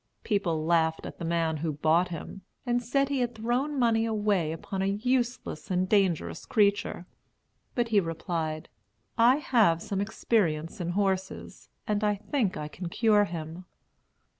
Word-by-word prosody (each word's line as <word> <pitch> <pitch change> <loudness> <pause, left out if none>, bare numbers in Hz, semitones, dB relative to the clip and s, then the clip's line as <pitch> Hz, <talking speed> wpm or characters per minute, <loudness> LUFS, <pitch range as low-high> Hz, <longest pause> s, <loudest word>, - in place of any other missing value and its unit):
People 170 -7 0
laughed 160 -1 +2
at - - -8
the - - -5
man 165 -1 0
who 160 +1 -2
bought 160 +4 +2
him, 175 +3 -7 0.2
and 245 -1 +1
said 275 +4 +1
he 280 -2 0
had 245 -1 -1
thrown 245 +6 -1
money 230 -3 +3
away 205 -7 +1
upon 190 +4 -4
a 195 - +1
useless 240 -3 -1
and 185 0 +1
dangerous 190 -5 +1
creature; 200 -4 +1 0.7
but 240 -2 0
he 215 -2 +4
replied, 165 -2 -3 0.5
"I 235 +3 +6
have 225 - +3
some 195 +3 -3
experience 190 -5 0
in 175 0 -2
horses, 190 -2 -2 0.2
and 210 0 -1
I 210 -1 +2
think 210 0 -1
I 150 - -4
can 170 +3 -7
cure 210 +1 +3
him." 165 0 -7
195 Hz, 155 wpm, -28 LUFS, 165-225 Hz, 0.7 s, I